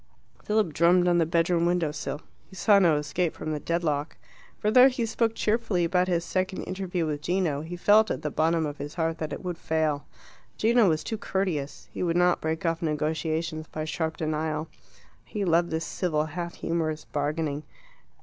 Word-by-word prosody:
Philip 210 -6 +1
drummed 175 +2 +4
on 175 -1 +4
the 165 - +2
bedroom 170 0 +2
window 175 -3 +1
sill. 150 -1 -5 0.3
He - - -14
saw 200 +1 +5
no 170 -5 +4
escape 150 +4 -1
from 155 - -4
the 150 - -2
deadlock. 155 -3 -1 0.4
For 210 - 0
though 255 +3 +8
he 250 -3 -2
spoke 225 0 0
cheerfully 215 -5 +1
about 180 +1 +2
his 170 -2 0
second 185 +1 -2
interview 185 -2 -2
with 150 -2 -3
Gino, 170 -4 0
he 165 +3 -6
felt 215 +4 +5
at - - -3
the 150 - -2
bottom 160 +1 +1
of 145 -1 -5
his 145 +1 -6
heart 165 -1 -1
that 155 - -3
it - - -6
would 180 -2 -4
fail. 155 -2 -1 0.5
Gino 230 -2 +4
was 155 -1 0
too 220 +4 -4
courteous: 180 -10 -2
he - - -5
would 170 -1 +1
not 180 0 +3
break 160 +2 -2
off 165 0 0
negotiations 155 +1 -2
by 155 0 -5
sharp 160 0 -2
denial; 155 0 -2 0.5
he 205 -3 -3
loved 170 0 +3
this 160 0 -2
civil, 155 -4 -1
half 170 +2 -5
humorous 160 -2 -2
bargaining. 150 0 -2
165 Hz, 190 wpm, -27 LUFS, 155-180 Hz, 0.5 s, though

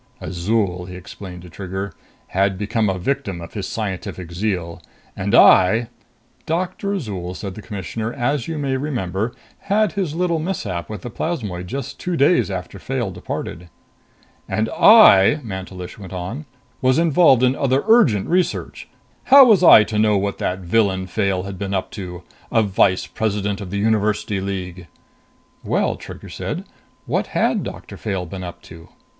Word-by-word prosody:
"Azol," 90 0 -1
he 90 - -8
explained 90 0 -10
to 90 - -11
Trigger, 95 0 -5 0.4
"had 95 0 +1
become 105 +1 0
a 95 - -1
victim 110 -2 -2
of 85 -1 -9
his 100 -3 -4
scientific 95 -4 -5
zeal. 90 -3 -3 0.3
And - - 0
I 110 +6 +6 0.3
" - - -38
"Doctor 185 +4 -2
Azol," 95 - -5
said 100 -1 -6
the 105 - -9
Commissioner, 110 +2 -5
"as 135 +1 -1
you 165 -1 -3
may 135 -2 -1
remember, 115 - -3 0.2
had 210 +1 +1
his 185 -7 -2
little 170 -2 0
mishap 155 - -3
with 105 -4 -7
the 120 - -6
plasmoid 105 - -4
just 135 +8 -5
two 180 -2 -2
days 145 0 +3
after 95 -2 -6
Fayle - - -3
departed." 85 +1 -6 0.8
"And 110 +3 0
I," 155 - +7
Mantelish 95 -3 -7
went 95 -2 -9
on, 95 - -5 0.4
"was 130 0 +3
involved 160 -5 +4
in 130 +1 +3
other 135 0 +1
urgent 145 - +4
research. 180 +1 -1 0.4
How 275 0 +9
was 215 -6 +5
I 110 - +9
to 105 0 -2
know 105 -1 +3
what 100 0 -2
that 95 +1 -2
villain 95 0 +1
Fayle 95 0 -1
had 95 -1 -7
been 100 -1 -2
up 95 - -3
to? 90 -3 -7 0.3
A 115 - +3
vice 95 -2 +2
president 105 -2 -2
of 95 - -6
the 100 - -3
University 105 -1 0
League!" 90 -2 -5 0.8
"Well," - - 0
Trigger - - -10
said, - - -4 0.4
"what - - -1
had - - +1
Doctor - - -8
Fayle 95 -4 -3
been 95 +2 -7
up 90 -1 -8
to?" 85 0 -13
100 Hz, 160 wpm, -21 LUFS, 95-130 Hz, 0.8 s, How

